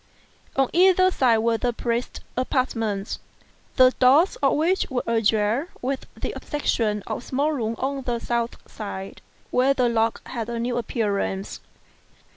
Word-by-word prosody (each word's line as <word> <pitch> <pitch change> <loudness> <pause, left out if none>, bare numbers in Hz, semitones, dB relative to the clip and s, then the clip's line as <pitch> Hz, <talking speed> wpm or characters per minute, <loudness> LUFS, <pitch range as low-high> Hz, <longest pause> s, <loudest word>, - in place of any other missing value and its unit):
On 270 -1 +3
either 370 +1 +5
side 245 -8 +3
were 225 0 +1
the 245 -1 0
priest's 235 +1 -3
apartments, 225 -6 -1 0.6
the 255 -1 +7
doors 280 +9 +5
of 275 -2 +2
which 345 +5 +1
were 260 -3 -1
ajar, 225 +4 +1
with 265 +1 -3
the - - -3
exception 220 -8 -1
of - - -3
a - - -11
small 280 +5 0
room 230 -6 -2
on 270 +1 -2
the 245 -2 -2
south 235 0 -2
side, 195 -2 -7 0.3
where 265 +2 +3
the 250 -2 +2
lock 225 -1 0
had 235 -3 -4
a 235 - -3
new 240 +1 -1
appearance. 205 -4 -2
240 Hz, 150 wpm, -24 LUFS, 225-270 Hz, 0.6 s, the